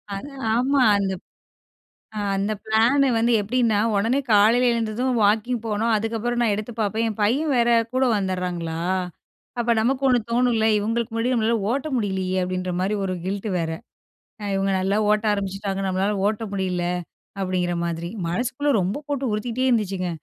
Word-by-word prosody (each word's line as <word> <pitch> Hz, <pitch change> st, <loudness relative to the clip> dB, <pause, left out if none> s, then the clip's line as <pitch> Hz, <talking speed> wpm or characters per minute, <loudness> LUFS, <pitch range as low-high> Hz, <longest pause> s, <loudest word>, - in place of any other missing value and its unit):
அது 275 Hz, +9 st, -7 dB, 0.3 s
ஆமா. 265 Hz, +3 st, +2 dB, 0.2 s
அந்த 195 Hz, -1 st, -1 dB
ப் -, -, -76 dB, 0.9 s
ஆ -, -, -1 dB, 0.2 s
அந்த 200 Hz, +2 st, -1 dB
பிளானு 235 Hz, +6 st, +3 dB
வந்து 235 Hz, +2 st, +2 dB
எப்படின்னா 220 Hz, 0 st, +1 dB, 0.2 s
உடனே 230 Hz, +7 st, +1 dB
காலையில 225 Hz, +4 st, +5 dB
எழுந்ததும் 235 Hz, +2 st, -1 dB
வாக்கிங் 220 Hz, +4 st, +2 dB
போணும், 225 Hz, +2 st, 0 dB
அதுக்கப்புறம் 225 Hz, +2 st, -2 dB
நான் 225 Hz, -, +2 dB
எடுத்து 215 Hz, +3 st, -5 dB
பார்ப்பேன் 220 Hz, +2 st, 0 dB
என் 220 Hz, -, -6 dB
பையன் 275 Hz, +9 st, +1 dB
வேற 240 Hz, 0 st, +3 dB, 0.2 s
கூட 260 Hz, +1 st, +2 dB
வந்துடுறாங்களா. 180 Hz, -4 st, -2 dB, 0.8 s
அப்போ 235 Hz, 0 st, +2 dB
நமக்கு 260 Hz, +4 st, 0 dB
ஒண்ணு 250 Hz, -1 st, +4 dB
தோணும்ல 235 Hz, -2 st, +2 dB
இவங்களுக்கு 225 Hz, +2 st, -2 dB
முன்னாடி 230 Hz, +3 st, 0 dB
நம்மளால 230 Hz, 0 st, +2 dB
ஓட்ட 275 Hz, +4 st, -1 dB
முடியலையே 190 Hz, -4 st, -1 dB
அப்படின்ற 185 Hz, 0 st, -2 dB
மாதிரி. 195 Hz, +3 st, 0 dB
ஒரு 185 Hz, -1 st, -2 dB
கில்ட் 200 Hz, +3 st, -3 dB
வேற 165 Hz, -1 st, -2 dB, 0.9 s
இவங்க 195 Hz, 0 st, 0 dB
நல்லா 195 Hz, +2 st, 0 dB
ஓட்ட 210 Hz, +1 st, +2 dB
ஆரம்பிச்சுட்டாங்க 195 Hz, 0 st, -3 dB
நம்மளால 190 Hz, +2 st, 0 dB
ஓட்ட 215 Hz, +1 st, -2 dB
முடியல 185 Hz, -3 st, -1 dB, 0.6 s
அப்படிங்கிற 185 Hz, -2 st, -1 dB
மாதிரி 170 Hz, 0 st, -3 dB, 0.2 s
மனசுக்குள்ளே 255 Hz, +10 st, -1 dB
ரொம்ப 195 Hz, +11 st, -2 dB
போட்டு 280 Hz, -2 st, -2 dB
உறுத்திட்டே 235 Hz, +4 st, -1 dB
இருந்துச்சுங்க. 195 Hz, -6 st, 0 dB
215 Hz, 150 wpm, -23 LUFS, 195-240 Hz, 0.9 s, காலையில